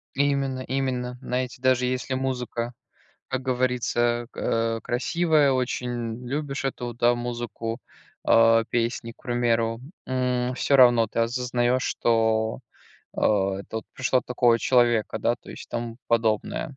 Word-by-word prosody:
Именно 140 Hz, -2 st, +1 dB
именно. 130 Hz, -2 st, -2 dB
Знаете, 125 Hz, -1 st, -3 dB
даже, 130 Hz, -1 st, +3 dB
если 130 Hz, +1 st, -2 dB
музыка, 125 Hz, -2 st, -3 dB, 0.6 s
как 130 Hz, 0 st, -2 dB
говорится, 125 Hz, -2 st, 0 dB
э, -, -, -15 dB
к -, -, -24 dB
э, 115 Hz, 0 st, 0 dB
красивая, 150 Hz, +3 st, +2 dB
очень 125 Hz, -2 st, -3 dB
любишь 140 Hz, +1 st, -3 dB
эту, 120 Hz, -3 st, -3 dB
да, 120 Hz, +1 st, +3 dB
музыку, 120 Hz, -1 st, -4 dB, 0.5 s
а, 115 Hz, 0 st, +5 dB
песни, 115 Hz, 0 st, -1 dB
к -, -, -28 dB
примеру. 115 Hz, -2 st, 0 dB, 0.3 s
М, 125 Hz, -1 st, 0 dB
всё 140 Hz, +2 st, +2 dB
равно 120 Hz, -3 st, +6 dB
ты 110 Hz, -, -6 dB
осознаешь, 125 Hz, +1 st, +1 dB
что, 110 Hz, -1 st, +1 dB, 0.6 s
э, -, -, -2 dB
это 100 Hz, 0 st, 0 dB
вот 110 Hz, -, -4 dB
пришло 130 Hz, 0 st, +1 dB
от -, -, -6 dB
такого 120 Hz, -2 st, +3 dB
человека, 120 Hz, -3 st, +2 dB
да, -, -, +1 dB
то -, -, -19 dB
есть, -, -, -9 dB
и -, -, -30 dB
тому 115 Hz, -1 st, -4 dB
подобное. 115 Hz, +3 st, 0 dB
120 Hz, 145 wpm, -25 LUFS, 115-130 Hz, 0.6 s, равно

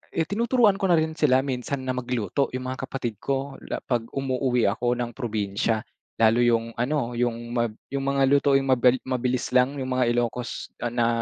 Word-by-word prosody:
Eh 165 Hz, -, +2 dB
tinuturuan 220 Hz, -, +2 dB
ko 195 Hz, -, +1 dB
na 175 Hz, -, +5 dB
rin 160 Hz, 0 st, +1 dB
sila 130 Hz, -3 st, +4 dB
minsan 130 Hz, 0 st, -3 dB
na 130 Hz, -, -1 dB
magluto, 125 Hz, +1 st, -1 dB
yung 130 Hz, 0 st, -3 dB
mga 130 Hz, -, -5 dB
kapatid 120 Hz, -5 st, -4 dB
ko, 135 Hz, 0 st, -3 dB
la -, -, -4 dB
'pag 120 Hz, -3 st, -1 dB
umuuwi 130 Hz, -2 st, 0 dB
ako 120 Hz, +3 st, 0 dB
ng 120 Hz, -1 st, -3 dB
probinsya. 110 Hz, -2 st, -1 dB, 0.3 s
Lalo 115 Hz, +1 st, +4 dB
yung 115 Hz, -1 st, +2 dB
ano, 125 Hz, -1 st, 0 dB
yung 120 Hz, -1 st, -2 dB
mab 120 Hz, -2 st, -1 dB, 0.2 s
yung 135 Hz, 0 st, -2 dB
mga 140 Hz, 0 st, +2 dB
lutuing 140 Hz, -1 st, +4 dB
mabil 130 Hz, -1 st, +4 dB
mabilis 130 Hz, -1 st, -1 dB
lang. 125 Hz, +2 st, +3 dB
Yung 130 Hz, -1 st, -4 dB
mga 125 Hz, -1 st, +2 dB
Ilocos, 120 Hz, 0 st, -3 dB
ah, 120 Hz, -, -1 dB
na, 120 Hz, 0 st, +1 dB
125 Hz, 185 wpm, -25 LUFS, 120-135 Hz, 0.3 s, na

